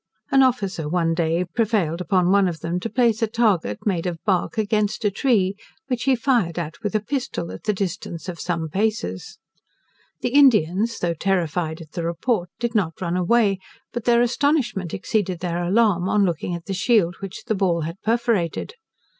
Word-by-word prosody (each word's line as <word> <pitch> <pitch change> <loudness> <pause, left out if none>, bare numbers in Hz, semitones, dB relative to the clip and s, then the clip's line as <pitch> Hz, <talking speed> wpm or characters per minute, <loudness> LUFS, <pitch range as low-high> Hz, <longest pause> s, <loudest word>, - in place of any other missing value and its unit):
An 270 - +6
officer 200 - +1
one 165 -1 +1
day 165 +1 0
prevailed 185 -4 0
on 180 -1 +3
one 200 -1 +4
of 165 -4 -4
them 170 +2 -2
to 230 - -4
place 235 -3 +2
a 225 - +3
target, 210 - 0
made 185 -4 0
of 175 -2 -3
bark, 195 +2 0
against 215 0 0
a 205 - +3
tree, 200 -4 +1 0.3
which 250 -2 -1
he 270 -1 +4
fired 230 - +1
at 155 -3 -5
with 210 -1 -3
a - - +4
pistol, 240 - -3
at - - -10
the 210 - +2
distance 185 -3 -4
of 175 -2 -6
some 170 -2 -2
paces. 190 - -2 0.8
The - - 0
Indians, 230 - +4
though 175 -1 0
terrified 170 -2 -1
at 155 -2 -12
the 170 - -4
report, 175 +3 -1
did 235 -1 -2
not 185 -8 0
run 175 -1 -2
away, 195 +2 +2 0.3
but 240 -2 -4
their 240 0 +4
astonishment 240 - 0
exceeded 190 -5 -1
their 175 0 -2
alarm, 190 -1 +2
on 205 -1 +3
looking 175 0 -2
at 170 -1 -8
the 195 - -3
shield 190 -2 +2
which 195 -1 -7
the 230 - 0
ball 185 -4 +1
had 165 +4 -5
perforated. 225 - 0
190 Hz, 185 wpm, -23 LUFS, 170-225 Hz, 0.8 s, An